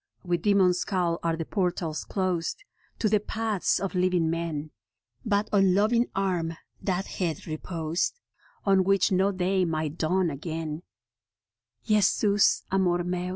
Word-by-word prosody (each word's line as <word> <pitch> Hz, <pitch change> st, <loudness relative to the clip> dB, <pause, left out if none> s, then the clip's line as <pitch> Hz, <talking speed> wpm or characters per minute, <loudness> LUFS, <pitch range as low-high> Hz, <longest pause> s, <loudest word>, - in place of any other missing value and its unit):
With 175 Hz, -2 st, -1 dB
demon 195 Hz, -3 st, +4 dB
scowl 180 Hz, -2 st, -1 dB
are 165 Hz, -1 st, 0 dB
the 165 Hz, -, -3 dB
portals 175 Hz, -5 st, -2 dB
closed 185 Hz, -, -2 dB, 0.3 s
To 220 Hz, -, +1 dB
the 210 Hz, 0 st, +3 dB
paths 215 Hz, -1 st, -1 dB
of 195 Hz, 0 st, -3 dB
living 180 Hz, -3 st, +2 dB
men; 160 Hz, -3 st, -3 dB, 0.5 s
But 205 Hz, -1 st, +1 dB
on 195 Hz, -2 st, +4 dB
loving 230 Hz, +4 st, +3 dB
Arm 175 Hz, -4 st, -1 dB, 0.2 s
that 190 Hz, 0 st, -1 dB
head 165 Hz, -5 st, -3 dB
reposed 165 Hz, -, -2 dB, 0.5 s
On 195 Hz, -2 st, +4 dB
which 195 Hz, 0 st, +2 dB
no 190 Hz, +2 st, +3 dB
day 190 Hz, 0 st, +1 dB
might 155 Hz, -2 st, -2 dB
dawn 180 Hz, +1 st, +1 dB
again, 160 Hz, +1 st, -5 dB, 1.0 s
Jesus 210 Hz, -1 st, +3 dB
Amor 180 Hz, -2 st, +2 dB
Meus. 180 Hz, 0 st, -2 dB
180 Hz, 135 wpm, -27 LUFS, 165-195 Hz, 1.0 s, demon